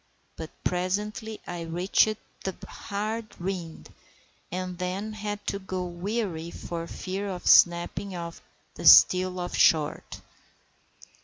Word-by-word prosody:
But 160 -1 -7
presently 210 +5 -2
I 175 -1 -5
reached 180 +6 +2 0.3
the 190 -2 -3
hard 215 +2 -5
rind, 175 -3 -5 0.6
and 185 0 -4
then 190 +4 -3
had 210 -1 -5
to 200 - -2
go 185 -1 -4
warily 175 -1 -3
for 170 -1 -6
fear 195 +4 -4
of 180 -2 -6
snapping 175 +3 +4
the 170 -2 -9
steel 185 0 +7
off 175 - -4
short. 155 -2 +2
185 Hz, 110 wpm, -27 LUFS, 175-205 Hz, 0.6 s, steel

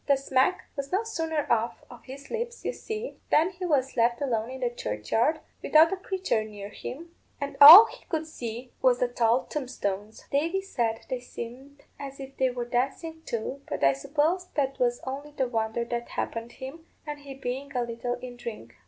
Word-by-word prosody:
The 280 -1 +4
smack 270 +6 +1
was 280 -1 -5
no 385 +4 +1
sooner 325 -8 -2
off 230 0 0
of 245 - -14
his 275 +1 -10
lips, 470 0 -4
you - - -1
see, 440 +1 -6
than 330 +5 +4
he 365 -1 -5
was 270 -4 +1
left 235 0 +2
alone 230 -5 -1
in 260 0 -7
the 245 -1 0
churchyard, 225 - 0 0.2
without 320 +4 +5
a - - +1
creature 375 - -1
near 205 -2 -8
him, 330 +10 -8 0.3
and 280 0 -4
all 335 +10 +14
he - - -12
could 320 -3 -2
see 245 -4 -7
was 255 -2 +4
the 250 - +1
tall 240 0 +2
tombstones. 215 -7 -4
Davy 330 +7 +1
said 230 -11 -2
they 255 - -2
seemed 255 +4 -9 0.2
as 275 -1 -8
if 270 0 -9
they 260 -1 +3
were 245 -1 -4
dancing 275 +7 -2
too, 235 +4 -3
but - - -3
I 135 0 +6
suppose 310 - 0
that 275 -2 0
was 240 -1 +1
only 280 +3 -6
the 265 -3 0
wonder 225 0 -1
that 235 0 -4
happened 230 +1 -4
him, 285 +5 -9 0.2
and 295 -1 -5
he 280 -1 -9
being 270 +1 -4
a 245 - +1
little 235 +1 -3
in 245 0 -9
drink. 215 - -8
265 Hz, 195 wpm, -27 LUFS, 235-305 Hz, 0.3 s, all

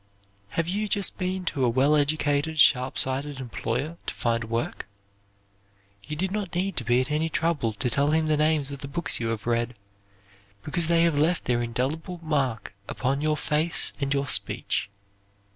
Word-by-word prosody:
Have 165 -1 +1
you 205 +4 -1
just 200 -1 0
been 185 0 -2
to 140 -6 -1
a 125 - +4
well 135 +5 +3
educated 145 +1 +1
sharp 130 -2 +4
sighted 135 +1 -1
employer 130 +5 -3
to - - -2
find 115 -1 0
work? 115 -2 -3 1.2
You 150 - -5
did 185 +4 -1
not 200 -4 -3
need 190 +1 -1
to - - 0
be 120 +2 +3
at 130 +3 -3
any 155 +2 +1
trouble 155 -8 0
to 110 - -2
tell 140 +5 +2
him 160 +1 +2
the 155 -1 +2
names 150 -2 +1
of 140 - -6
the 140 - -6
books 145 +2 +1
you 115 - -1
have 115 -2 -3
read, 120 0 0 0.9
because 165 +2 -1
they 170 0 +4
have 170 -1 +3
left 160 +4 +1
their 120 -1 +1
indelible 140 +9 -3
mark 135 -8 -1 0.2
upon 135 +2 -1
your 155 0 +1
face 155 +3 +1
and 140 0 -1
your 140 0 +1
speech. 105 - 0
145 Hz, 180 wpm, -26 LUFS, 125-160 Hz, 1.2 s, a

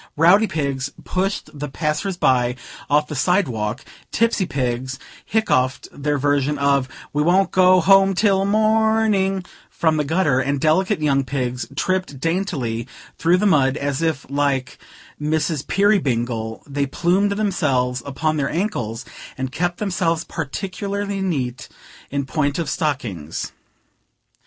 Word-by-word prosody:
Rowdy 185 +7 +5
pigs 140 -5 -2
pushed 195 +2 -2
the 145 -1 -5
passers 155 +6 -2
by 125 -5 +2 0.3
off 150 +1 +3
the 150 - -7
side 180 +7 +2
walk; 105 -3 -3 0.3
tipsy 225 -5 +1
pigs 130 0 -2 0.3
hiccoughed 130 -13 +1
their 145 +1 -1
version 145 +1 +1
of 140 -2 +2 0.2
"We 145 - +1
wont 180 +5 +3
go 185 0 +5
home 195 +2 +5
till 195 -1 +3
morning," 215 -2 +2 0.2
from 160 -2 +1
the 150 - +1
gutter; 150 -3 +2
and 140 +1 0
delicate 165 +4 +2
young 140 -2 +2
pigs 125 -1 -3
tripped 185 -5 -1
daintily 140 - -2 0.3
through 170 +3 +4
the 205 - 0
mud, 145 -7 +3
as 140 +1 -2
if, 160 -4 -1
like 140 -2 -1 0.4
"Mrs. 155 -1 -1
Peerybingle," 120 - +1
they 140 0 -2
plumed 185 +8 +1
themselves 140 - 0
upon 155 +3 -1
their 140 -2 0
ankles, 130 - -2 0.3
and 130 0 -3
kept 175 +4 -1
themselves 175 -5 0
particularly 195 +5 -4
neat 140 -7 -2 0.4
in 140 -1 -2
point 145 0 -1
of 165 -5 -2
stockings. 110 - -3
150 Hz, 130 wpm, -21 LUFS, 135-190 Hz, 0.4 s, Rowdy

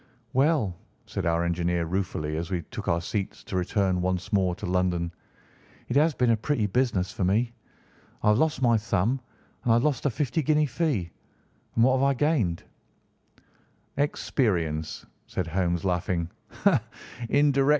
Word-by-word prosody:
"Well," 135 - +2 0.3
said - - -3
our 85 0 +2
engineer 85 0 0
ruefully 80 -4 -2
as 85 +2 -3
we 90 -3 -2
took - - -6
our 85 0 +2
seats 100 +3 -3
to - - -6
return 95 0 +1
once 90 +1 -2
more 95 -3 +2
to - - -7
London, 90 -1 0 0.8
"it 125 - -1
has 150 +1 +4
been 125 -2 +3
a - - +5
pretty 115 0 0
business 105 -3 +1
for - - -3
me! 110 +6 +2 0.7
I - - +4
have 105 +2 +4
lost 155 -4 +1
my 120 -2 +5
thumb 110 +4 0 0.4
and 120 - +2
I - - +6
have 120 - +3
lost 145 -2 +1
a - - +3
fifty 145 +6 -1
guinea 150 +1 +3
fee, 130 - -1 0.6
and 115 - +4
what 130 +1 +5
have - - +2
I 140 0 +3
gained?" 120 - +1 1.3
"Experience," 85 - 0 0.2
said 90 - -2
Holmes, 85 +1 0
laughing. 90 -2 0
95 Hz, 155 wpm, -27 LUFS, 90-130 Hz, 1.3 s, I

